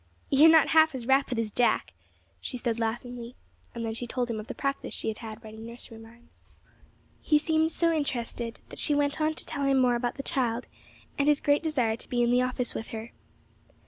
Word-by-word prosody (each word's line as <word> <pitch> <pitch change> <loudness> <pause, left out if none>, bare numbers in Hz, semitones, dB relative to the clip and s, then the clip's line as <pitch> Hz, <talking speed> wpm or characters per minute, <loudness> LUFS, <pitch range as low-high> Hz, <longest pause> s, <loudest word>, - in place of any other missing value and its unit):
"You 285 +3 +7
are - - +8
not 320 -2 +6
half 315 -2 +5
as 245 -3 -6
rapid 270 -1 +2
as 225 -2 -1
Jack," 240 +3 +1 0.5
she 255 - -5
said, 235 -2 -2
laughingly; 240 +2 -4 0.4
and 230 -1 -3
then 225 - -2
she 240 +2 -5
told 245 0 -2
him 220 - -3
of 215 - -8
the - - -6
practice 275 0 -3
she - - -3
had 215 - -5
had 225 -1 -8
writing 220 0 -10
nursery 230 0 -10
rhymes. 235 +2 -18 0.8
He 305 - +3
seemed 315 +1 +2
so 335 0 +2
interested 240 -5 -3
that - - -7
she 295 - +3
went 285 +1 0
on 310 0 +1
to - - -1
tell 285 -3 -3
him 275 -1 +3
more 250 -2 +4
about 240 0 -1
the 275 - -6
child, 250 -6 0 0.5
and 280 - +2
his 295 -1 +4
great 290 0 +2
desire 255 -9 0
to - - -8
be 240 -1 +1
in 240 - +2
the 250 +1 +4
office 255 -1 -1
with 220 - -5
her. 225 +1 -7
245 Hz, 220 wpm, -28 LUFS, 230-285 Hz, 0.8 s, are